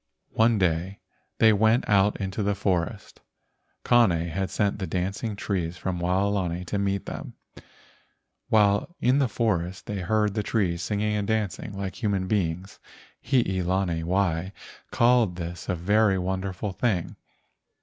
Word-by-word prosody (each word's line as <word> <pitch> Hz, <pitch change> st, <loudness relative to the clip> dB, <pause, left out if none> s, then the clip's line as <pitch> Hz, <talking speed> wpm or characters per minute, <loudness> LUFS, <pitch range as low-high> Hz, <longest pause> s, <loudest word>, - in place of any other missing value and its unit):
One 115 Hz, 0 st, +3 dB
day 90 Hz, +1 st, 0 dB, 0.4 s
they 110 Hz, -1 st, +6 dB
went 110 Hz, +4 st, +3 dB
out 100 Hz, 0 st, +3 dB
into 95 Hz, +2 st, -3 dB
the 100 Hz, 0 st, 0 dB
forest. 95 Hz, 0 st, -2 dB, 0.6 s
Kane 120 Hz, -3 st, +5 dB, 0.2 s
had 95 Hz, +3 st, -2 dB
sent 100 Hz, -1 st, 0 dB
the 95 Hz, -, -3 dB
dancing 100 Hz, +4 st, -2 dB
trees 90 Hz, -4 st, -3 dB
from 95 Hz, -2 st, -3 dB
Waolani 90 Hz, -1 st, 0 dB
to 100 Hz, +3 st, -2 dB
meet 100 Hz, -1 st, -1 dB
them. -, -, -7 dB, 1.1 s
While 105 Hz, -, +3 dB
in 130 Hz, +3 st, +3 dB
the 135 Hz, -, +3 dB
forest 95 Hz, -6 st, -1 dB
they 105 Hz, -2 st, -4 dB
heard 105 Hz, +2 st, +1 dB
the 105 Hz, -, -1 dB
trees 95 Hz, -5 st, 0 dB
singing 105 Hz, +3 st, -1 dB
and 100 Hz, -1 st, -2 dB
dancing 105 Hz, -2 st, -2 dB
like 95 Hz, +2 st, -5 dB
human 100 Hz, -4 st, 0 dB
beings. 90 Hz, -1 st, -2 dB, 0.4 s
Hii 115 Hz, -8 st, +1 dB
lani 90 Hz, -2 st, 0 dB
wai 90 Hz, 0 st, 0 dB, 0.4 s
called 120 Hz, -6 st, +3 dB
this 85 Hz, 0 st, -6 dB
a 90 Hz, -, +1 dB
very 100 Hz, +3 st, +2 dB
wonderful 95 Hz, +2 st, -3 dB
thing. 95 Hz, -3 st, -1 dB
100 Hz, 140 wpm, -26 LUFS, 90-105 Hz, 1.1 s, they